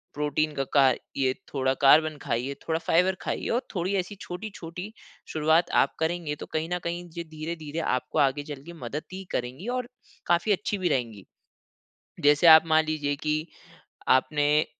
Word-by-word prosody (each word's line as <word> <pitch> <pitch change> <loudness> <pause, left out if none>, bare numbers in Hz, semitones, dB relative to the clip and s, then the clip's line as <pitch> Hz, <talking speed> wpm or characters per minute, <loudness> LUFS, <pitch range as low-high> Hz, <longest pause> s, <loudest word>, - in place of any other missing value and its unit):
Protein 150 +1 0
का 135 - 0
का 135 -2 +6 0.3
ये 130 -1 +2 0.2
थोड़ा 130 -1 +1
कार्बन 155 +2 +6
खाइए, 125 +4 -2
थोड़ा 160 0 0
फाइबर 180 +3 +2
खाइए, - - -3
और 240 +3 +1
थोड़ी 185 +2 -1
ऐसी 185 +3 -3
छोटी-छोटी 180 0 -7 0.4
शुरुआत 160 +2 +3
आप - - -5
करेंगे, 160 -2 -1
तो - - -8
कहीं 160 +2 -1
न 180 - -1
कहीं 175 +1 -4
जे 170 +1 -6
धीरे-धीरे 155 0 -6 0.2
आपको 130 +4 -2
आगे 140 +1 +2
चल 145 -2 -8
के 170 - -9
मदद 150 0 -5
ही 190 +1 -6
करेंगी 125 - -4
और 250 -1 -4 0.4
काफ़ी 175 +5 +2
अच्छी 205 +1 0
भी 185 -2 0
रहेंगी। 115 -8 -2 1.0
जैसे 145 +3 +5
आप 160 0 +10
मान 160 0 +4
लीजिए 145 -2 -1
कि 150 +1 -1 0.7
आपने, 150 +3 +3
155 Hz, 165 wpm, -26 LUFS, 145-175 Hz, 1.0 s, आप